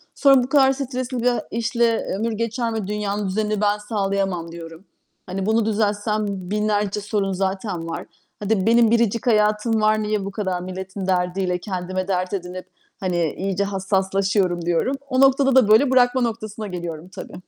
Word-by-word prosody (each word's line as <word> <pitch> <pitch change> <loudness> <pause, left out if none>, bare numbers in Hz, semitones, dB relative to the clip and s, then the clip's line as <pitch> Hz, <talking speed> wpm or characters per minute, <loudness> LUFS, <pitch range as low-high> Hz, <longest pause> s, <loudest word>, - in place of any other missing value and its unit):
Sonra, 275 -3 +5
"Bu 255 - -5
kadar 270 -2 +5
stresli 255 -2 -4
bir 235 - -3
a 240 - -1
işle 230 0 +1
ömür 230 +2 -1
geçer 230 +1 -2
mi? 220 -3 -3
Dünyanın 205 -1 -2
düzenini 210 +1 -1
ben 205 0 +2
sağlayamam." 195 -5 -2
diyorum. 165 +2 -10 0.4
"Hani, 190 +1 -3
bunu 220 0 +2
düzeltsem 210 0 0
binlerce 205 +1 -1
sorun 200 -2 -1
zaten 190 -2 -3
var. 165 - -5 0.3
Hadi 205 -1 0
benim 230 -1 +5
biricik 230 0 +1
hayatım 215 0 +2
var. 215 0 +3
Niye 210 -2 -1
bu 200 - -4
kadar 190 -4 -2
milletin 190 +1 -6
derdiyle 180 0 0
kendime 185 0 -4
dert 185 -1 -1
edinip, 185 -1 -5 0.3
hani, 175 -4 0
iyice 195 +1 -1
hassaslaşıyorum?" 190 -2 0
diyorum. 175 +11 +1
O 255 +1 +2
noktada 270 0 +4
da 255 -5 +6
böyle 235 +6 +5
bırakma 255 0 +4
noktasına 220 -2 -3
geliyorum 175 -2 -6
tabii. 185 - -9
205 Hz, 160 wpm, -22 LUFS, 190-225 Hz, 0.4 s, da